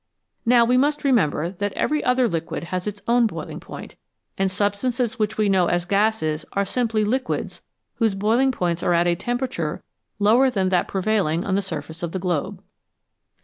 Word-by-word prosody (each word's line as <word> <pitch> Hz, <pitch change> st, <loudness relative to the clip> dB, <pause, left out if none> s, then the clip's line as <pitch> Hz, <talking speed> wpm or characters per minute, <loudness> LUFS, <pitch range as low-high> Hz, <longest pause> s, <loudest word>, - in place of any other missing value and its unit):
Now 240 Hz, -1 st, +6 dB
we 250 Hz, +2 st, +3 dB
must 295 Hz, +3 st, +1 dB
remember 180 Hz, -, +2 dB
that 200 Hz, +1 st, -3 dB
every 300 Hz, 0 st, 0 dB
other 250 Hz, 0 st, +3 dB
liquid 165 Hz, -4 st, -3 dB
has 185 Hz, +2 st, -2 dB
its 205 Hz, 0 st, -5 dB
own 235 Hz, 0 st, +4 dB
boiling -, -, -6 dB
point, -, -, -10 dB, 0.4 s
and 195 Hz, 0 st, +1 dB
substances 225 Hz, +5 st, -1 dB
which 215 Hz, -1 st, -1 dB
we 215 Hz, -1 st, +2 dB
know 190 Hz, -3 st, +3 dB
as 175 Hz, 0 st, 0 dB
gases 195 Hz, -6 st, +1 dB
are 200 Hz, 0 st, +1 dB
simply 225 Hz, 0 st, 0 dB
liquids 255 Hz, +5 st, -2 dB, 0.4 s
whose 220 Hz, -4 st, +1 dB
boiling 230 Hz, +7 st, +2 dB
points 175 Hz, -7 st, -1 dB
are 175 Hz, -, +2 dB
at 170 Hz, +1 st, +3 dB
a 175 Hz, -, +3 dB
tempera 245 Hz, +8 st, -2 dB
ture 160 Hz, -9 st, -4 dB, 0.3 s
lower 225 Hz, +6 st, +4 dB
than 195 Hz, -6 st, 0 dB
that 180 Hz, -1 st, +1 dB
prevailing 190 Hz, -4 st, 0 dB
on 195 Hz, -, -1 dB
the 200 Hz, -, +2 dB
surface 160 Hz, -4 st, -7 dB
of 170 Hz, -1 st, -4 dB
the -, -, -1 dB
globe. 175 Hz, -5 st, -2 dB
205 Hz, 185 wpm, -23 LUFS, 175-240 Hz, 0.4 s, Now